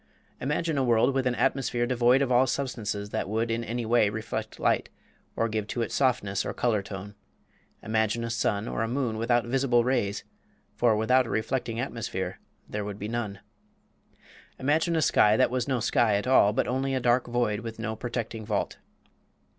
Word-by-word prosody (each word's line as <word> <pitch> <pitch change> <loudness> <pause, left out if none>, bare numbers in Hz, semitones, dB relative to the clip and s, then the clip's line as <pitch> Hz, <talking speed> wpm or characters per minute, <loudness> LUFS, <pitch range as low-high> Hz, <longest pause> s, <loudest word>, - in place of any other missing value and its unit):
Imagine 150 +2 -1
a - - +2
world 120 +2 +3
with 130 -1 +1
an 125 - 0
atmosphere 120 -3 0
devoid 125 +2 +3
of 130 - -2
all 125 +2 +4
substances 110 -6 -3
that - - -2
would 115 +2 0
in 115 +1 -1
any 115 +1 -3
way 115 -2 +3
reflect 110 +1 -5
light - - +1 0.5
or 115 - +1
give 110 -2 -3
to 120 +2 -2
it - - -5
softness 120 -7 +1
or - - -4
color 115 -4 +1
tone. 100 +1 -8 0.7
Imagine 110 +1 0
a 115 - -3
sun 110 -1 0
or - - -2
a 115 - 0
moon 120 -3 -1
without 120 +1 +2
visible 125 -1 +2
rays 115 -5 0 0.5
for 120 -3 +3
without 125 +4 +3
a - - -7
reflecting 115 0 -2
atmosphere 105 -7 -4 0.3
there 105 0 -4
would 100 -1 -5
be 105 - -5
none. 110 -4 -4 1.2
Imagine 160 +5 +1
a 160 - +2
sky 105 -5 +4
that 130 - +3
was 125 0 -1
no 130 -3 0
sky 115 -2 +2
at 100 - -1
all, 125 -5 +5
but 105 - 0
only 135 +1 -1
a - - +1
dark 120 0 +2
void, 120 -3 0
with 115 -1 -7
no 110 -1 -3
protecting 115 -1 -4
vault. 105 -2 -2
115 Hz, 185 wpm, -27 LUFS, 110-125 Hz, 1.2 s, all